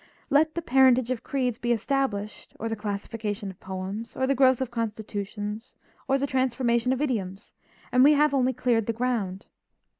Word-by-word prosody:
Let 310 +2 +3
the 340 - -3
parentage 255 -2 +4
of 250 - -2
creeds 250 -4 -2
be 240 0 -1
established, 225 -3 -2
or 225 - -3
the 225 - -2
classification 210 0 -4
of 190 - -18
poems, 190 +4 -6
or 260 - 0
the 275 - +2
growth 260 -1 +4
of 260 -3 -3
constitutions, 215 -1 -5 0.3
or 270 0 +3
the 275 - 0
transformations 255 -2 +1
of 260 +3 -1
idioms, 195 -9 -3 0.4
and 250 +1 +5
we 295 +2 +7
have 300 0 +3
only 260 -2 +2
cleared 240 -3 0
the 230 - 0
ground. 225 -5 -2
240 Hz, 175 wpm, -26 LUFS, 210-260 Hz, 0.4 s, we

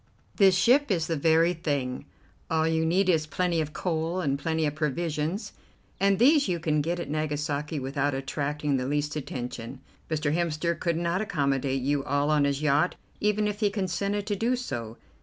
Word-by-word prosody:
This 195 -3 +6
ship 255 +9 +4
is 170 -6 +1
the 165 -1 -1
very 165 +3 +3
thing. 140 -7 -2 0.4
All 160 0 +2
you 160 0 +1
need 185 +4 +2
is 160 -4 +2
plenty 175 0 0
of 155 -1 -4
coal 165 +1 -2
and 140 -5 0
plenty 160 +1 0
of 145 - -1
provisions, 155 - -2 0.5
and 195 0 +3
these 280 - +5
you 175 -2 -1
can 155 -2 +1
get 170 +4 -2
at - - -4
Nagasaki 150 0 -2
without 140 +1 -1
attracting 145 +1 -1
the 125 0 -2
least 145 +1 -1
attention. 125 -3 -5 0.3
Mr. 150 -2 0
Hemster 170 0 0
could 170 -2 0
not 170 +3 0
accommodate 140 -8 0
you 140 +1 +1
all 145 +1 +1
on 150 -2 +3
his 140 +1 -1
yacht 150 +4 +2 0.2
even 210 0 +1
if 205 0 -3
he 210 -2 +3
consented 200 +1 -2
to 205 -1 -1
do 235 +5 +1
so. 120 - -5
160 Hz, 180 wpm, -27 LUFS, 145-180 Hz, 0.5 s, This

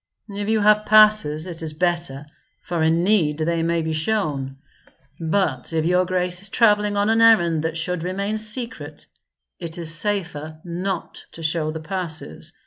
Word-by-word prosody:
"If 205 +1 -4
you 220 -1 +2
have 210 +1 +4
passes, 215 -8 +5
it 170 -3 -8
is 160 -1 -5
better, 170 -4 -1 0.3
for 170 -2 -3
in 165 +2 +2
need 175 -7 +2
they 165 +1 0
may 165 0 0
be 160 0 -2
shown; 155 -7 -2 0.6
but 160 -5 -1
if 160 -1 0
your 180 +1 +3
grace 180 -1 -1
is 200 - -9
travelling 210 -3 +3
on 205 +2 +2
an 225 0 +3
errand 175 -9 +5
that 165 0 -2
should 170 +1 -2
remain 200 +5 -2
secret, 230 +3 -5 0.5
it 170 -1 -5
is 165 -2 -4
safer 165 -5 -2
not 180 +1 -4
to 165 - -9
show 155 0 0
the 160 0 -5
passes. 160 - -4
175 Hz, 165 wpm, -22 LUFS, 160-205 Hz, 0.6 s, passes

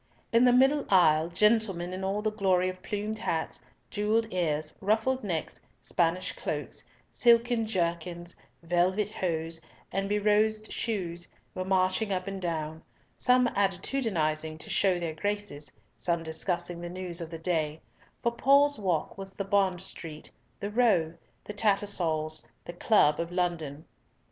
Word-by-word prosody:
In 235 +2 +6
the 250 - +6
middle 270 +4 +4
aisle, 160 -4 +5
gentlemen 195 -2 +2
in 190 +1 -5
all 200 +2 -1
the 215 - +1
glory 185 -3 +2
of 185 0 -8
plumed 210 +2 -3
hats, 165 -7 -2 0.3
jewelled 215 +2 +1
ears, 155 -4 -1
ruffed 220 +6 +1
necks, 170 -6 -3 0.2
Spanish 175 +1 0
cloaks, - - -4 0.2
silken 235 -1 +3
jerkins, 175 -2 -2 0.3
velvet 180 +4 +1
hose, 165 -4 -2 0.3
and 195 +1 -1
be 210 - +2
rosed 215 +1 +2
shoes, 175 -6 -3 0.3
were 185 - -3
marching 190 +2 +1
up 185 -1 -1
and 195 -1 -5
down, 160 -2 -3 0.3
some 250 0 +4
attitudinising 180 - 0
to - - -8
show 190 -3 +3
their 165 -2 -3
graces, 205 -5 -3 0.2
some 170 -1 -1
discussing 170 +2 -2
the 175 - -5
news 180 -1 -3
of 165 - -5
the 165 - -6
day, 160 -2 -1 0.4
for 235 - +2
"Paul's 280 +2 +4
Walk" 185 -2 -1
was 195 0 -6
the 200 - -3
Bond 195 -3 +2
Street, 160 -4 -8 0.3
the 200 - -4
Row, 205 -9 +3 0.3
the 210 - -7
Tattersall's, 175 - 0 0.2
the 175 - -7
Club 175 -5 +3
of 170 +1 -3
London. 165 -5 -2
185 Hz, 145 wpm, -29 LUFS, 170-210 Hz, 0.4 s, In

